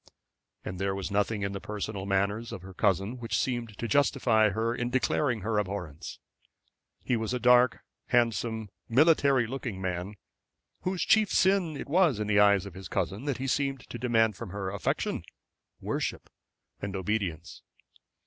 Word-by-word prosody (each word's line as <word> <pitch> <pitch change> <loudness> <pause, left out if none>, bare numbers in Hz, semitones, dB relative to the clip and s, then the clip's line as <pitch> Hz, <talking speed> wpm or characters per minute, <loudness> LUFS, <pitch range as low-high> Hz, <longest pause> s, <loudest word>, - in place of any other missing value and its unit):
And 90 0 -5
there 95 0 0
was 100 0 -4
nothing 105 +1 0
in 100 - -1
the 100 -1 -5
personal 105 -2 -5
manners 100 +4 0
of 90 - -7
her 95 0 -10
cousin 100 +7 0
which 115 -1 -2
seemed 120 -4 -2
to 120 - -3
justify 110 -4 +3
her 110 +3 -1
in 120 0 -2
declaring 125 -2 +1
her 105 +1 0
abhorrence. 90 -7 -5 0.9
He 125 - +1
was 110 +2 -2
a - - -2
dark, 125 +1 +5 0.3
handsome, 115 -2 +1 0.2
military 140 -1 +4
looking 120 -5 -5
man, 95 +2 -3 0.7
whose 185 -1 -1
chief 215 -2 +4
sin 185 -5 +2
it - - -6
was 160 - +3
in 105 - -1
the 105 -1 +3
eyes 100 -2 +5
of 100 - -8
his 95 0 -8
cousin 105 +9 -2
that 140 -4 -1
he 130 - -4
seemed 135 0 0
to 120 - -6
demand 115 -4 +2
from 115 +1 -7
her 95 0 -4
affection, 100 - -1 0.6
worship, - - -3 0.5
and 100 -1 -4
obedience. 95 -4 -3
110 Hz, 165 wpm, -29 LUFS, 100-125 Hz, 0.9 s, dark